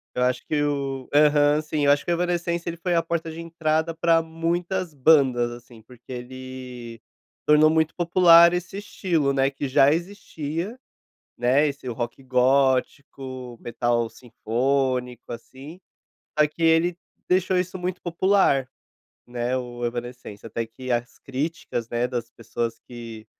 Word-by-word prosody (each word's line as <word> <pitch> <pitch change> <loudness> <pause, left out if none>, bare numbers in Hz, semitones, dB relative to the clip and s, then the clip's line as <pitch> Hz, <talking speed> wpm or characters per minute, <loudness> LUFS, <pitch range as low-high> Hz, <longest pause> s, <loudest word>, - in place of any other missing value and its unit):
Eu 125 - -1
acho 125 0 0
que 150 -2 0
o 140 -3 -2
aham, 150 0 +5
sim, 155 -2 -1
acho 145 0 +3
que - - -1
o - - +4
Evanescence 175 0 -1
ele 170 - -6
foi 175 +1 -1
a 165 - +3
porta 165 -1 -3
de 165 - -7
entrada 165 -1 -1
para 165 0 +3
muitas 170 +2 -2
bandas, 130 -4 +4
assim, 120 -1 -12
porque 125 +2 -16
ele 125 -2 -8 0.5
tornou 150 +1 +6
muito 160 0 +1
popular 170 -1 +6
esse 180 +2 -4
estilo, 170 -8 -1
né, 135 0 +2
que 140 0 -4
já 135 +2 +5
existia, 170 - -4 0.6
né, 130 +5 +3
esse 140 -2 -6
rock 120 +2 -4
gótico, 130 -1 0
metal 120 -1 0
sinfônico, 125 +1 -1
assim, 135 +8 -10 0.6
só 150 - +6
que 155 +3 -6
ele 165 +2 +3 0.3
deixou 185 0 +2
isso 185 +1 -2
muito 180 0 -4
popular, 175 -6 +2 0.6
né, 120 +1 -2
o 120 -1 -5
Evanescence, 120 -3 -6
até 115 +1 -3
que 130 +3 -9
as 120 +1 -2
críticas, 135 -4 -4
né, 120 +1 0
das 120 -2 -4
pessoas 115 0 -4
que 115 -3 -9
140 Hz, 145 wpm, -24 LUFS, 125-165 Hz, 0.6 s, tornou